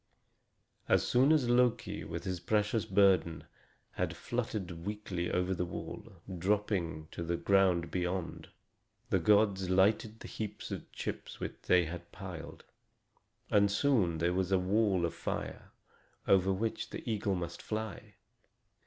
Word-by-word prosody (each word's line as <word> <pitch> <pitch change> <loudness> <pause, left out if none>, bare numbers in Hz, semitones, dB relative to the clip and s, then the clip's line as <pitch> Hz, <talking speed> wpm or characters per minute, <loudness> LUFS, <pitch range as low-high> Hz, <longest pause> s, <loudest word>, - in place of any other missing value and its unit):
As - - +3
soon 130 +4 +4
as 150 -6 +4
Loki, 120 -1 +2
with - - -5
his 90 -2 -3
precious 105 +4 +1
burden, 95 -4 +3 0.5
had - - -2
fluttered 105 -8 -4
weakly 100 -3 -3
over 90 +1 0
the 90 -1 -1
wall, 90 - -7 0.3
dropping 90 -5 0
to - - -6
the 85 +1 -1
ground 90 -4 +3
beyond, 90 -1 -3 0.6
the - - +4
gods 100 -3 +3
lighted 105 +4 +2
the - - -9
heaps 105 -1 -6
of - - -6
chips - - -6
which - - -5
they 90 -1 +5
had 85 +2 -7
piled, 90 -4 -8 0.9
and 100 -1 +5
soon 105 - +2
there 85 +2 +1
was 95 0 0
a 95 - +5
wall 95 -1 +2
of 85 - -3
fire, - - -5 0.6
over 95 0 +4
which 110 +4 -2
the - - -8
eagle 105 -3 0
must 85 -1 -5
fly. 110 -1 -5
95 Hz, 140 wpm, -32 LUFS, 90-105 Hz, 0.9 s, they